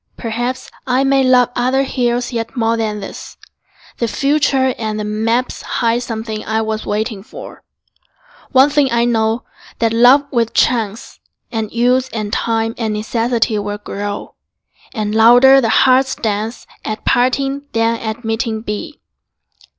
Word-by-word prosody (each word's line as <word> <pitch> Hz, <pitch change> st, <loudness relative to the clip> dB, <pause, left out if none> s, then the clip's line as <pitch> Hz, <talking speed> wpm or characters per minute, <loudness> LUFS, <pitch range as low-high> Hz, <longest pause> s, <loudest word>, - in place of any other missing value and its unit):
Perhaps 240 Hz, +2 st, -4 dB, 0.2 s
I 255 Hz, +1 st, +2 dB
may 270 Hz, 0 st, +3 dB
love 250 Hz, -1 st, +4 dB
other 255 Hz, +2 st, +1 dB
hills 245 Hz, -2 st, -1 dB
yet 230 Hz, +2 st, -4 dB
more 225 Hz, 0 st, +1 dB
Than 215 Hz, -2 st, -2 dB
this: 195 Hz, -, -9 dB, 0.6 s
the 235 Hz, -, 0 dB
future 275 Hz, 0 st, +1 dB
and 215 Hz, -1 st, -3 dB
the -, -, -2 dB
maps 225 Hz, +4 st, -1 dB
Hide 235 Hz, 0 st, 0 dB
something 220 Hz, -2 st, -5 dB
I 220 Hz, +1 st, -1 dB
was 220 Hz, 0 st, -4 dB
waiting 210 Hz, 0 st, -2 dB
for. 205 Hz, -, -11 dB, 0.9 s
One 265 Hz, +2 st, +5 dB
thing 285 Hz, -3 st, +2 dB
I 235 Hz, 0 st, +2 dB
know, 225 Hz, 0 st, 0 dB, 0.3 s
that 230 Hz, -1 st, +1 dB
love 250 Hz, +5 st, +5 dB
with 230 Hz, -3 st, 0 dB
chance 225 Hz, -3 st, 0 dB, 0.3 s
And 220 Hz, -2 st, -3 dB
use 250 Hz, +2 st, +1 dB
and 215 Hz, -3 st, -4 dB
time 225 Hz, -1 st, 0 dB
and 220 Hz, -2 st, -1 dB
necessity 225 Hz, 0 st, 0 dB
Will 205 Hz, 0 st, -4 dB
grow, 205 Hz, 0 st, -6 dB, 0.6 s
and 215 Hz, -3 st, -3 dB
louder 245 Hz, +5 st, +7 dB
the 230 Hz, -, 0 dB
heart's 260 Hz, +4 st, +3 dB
dance 220 Hz, +1 st, -3 dB, 0.2 s
At 215 Hz, 0 st, -5 dB
parting 275 Hz, +3 st, +1 dB
than 230 Hz, 0 st, +1 dB
at 220 Hz, +2 st, -5 dB
meeting 225 Hz, 0 st, -2 dB
be. 230 Hz, +9 st, -6 dB
230 Hz, 145 wpm, -17 LUFS, 220-255 Hz, 0.9 s, louder